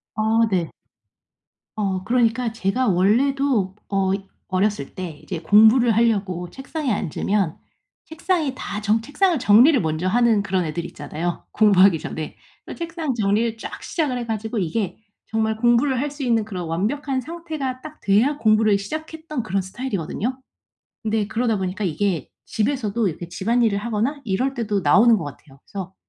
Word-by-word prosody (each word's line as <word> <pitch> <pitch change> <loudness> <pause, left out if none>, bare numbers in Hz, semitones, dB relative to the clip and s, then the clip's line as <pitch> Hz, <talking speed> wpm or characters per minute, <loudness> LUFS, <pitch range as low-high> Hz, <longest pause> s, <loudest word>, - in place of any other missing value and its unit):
아 220 +1 +2
네. 175 -4 0 1.1
어 190 -3 -1
그러니까 235 0 +1
제가 225 +4 0
원래도 215 +2 +2
어 195 -1 +1 0.4
어렸을 190 -6 -1
때 170 -5 -6
이제 180 -4 -5
공부를 220 +6 +5
하려고 195 -6 +1
책상에 275 0 -4
앉으면 195 -1 -1 0.5
책상이 320 -3 -1
다 210 -4 -5
전 215 +2 +2
책상을 300 +7 +1
정리를 245 +6 +6
먼저 160 +2 -1
하는 230 +1 +3
그런 190 -3 -1
애들 165 +2 -3
있잖아요, 170 +1 -5
공부하기 195 -5 +5
전에. 155 -1 -6 0.3
그 - - -8
책상 330 -4 -3
정리를 220 +1 0
쫙 - - -8
시작을 295 -7 -1
해 240 - -4
가지고 220 0 -3
이게 190 +3 -2 0.3
정말 220 0 0
공부를 240 +3 +3
할 290 +2 -1
수 290 -1 -6
있는 230 -3 +2
그런 185 -5 -5
완벽한 260 - -1
상태가 310 -5 -5
딱 310 0 -10
돼야 230 +9 +3
공부를 215 -2 +3
시작했던 310 +4 -5
그런 195 -1 -1
스타일이거든요. 210 +3 -4 0.6
근데 220 -2 0
그러다 225 0 0
보니까 190 +2 -3
이게 175 -2 -1 0.2
집에서도 225 -2 0
이렇게 170 0 -6
집안일을 220 +4 +1
하거나 235 +6 -2
이럴 245 +7 0
때도 215 -5 -1
나오는 210 +9 +5
것 170 - -4
같아요. 140 -1 -11
그래서 190 -1 -7
220 Hz, 345 characters per minute, -22 LUFS, 190-255 Hz, 1.1 s, 정리를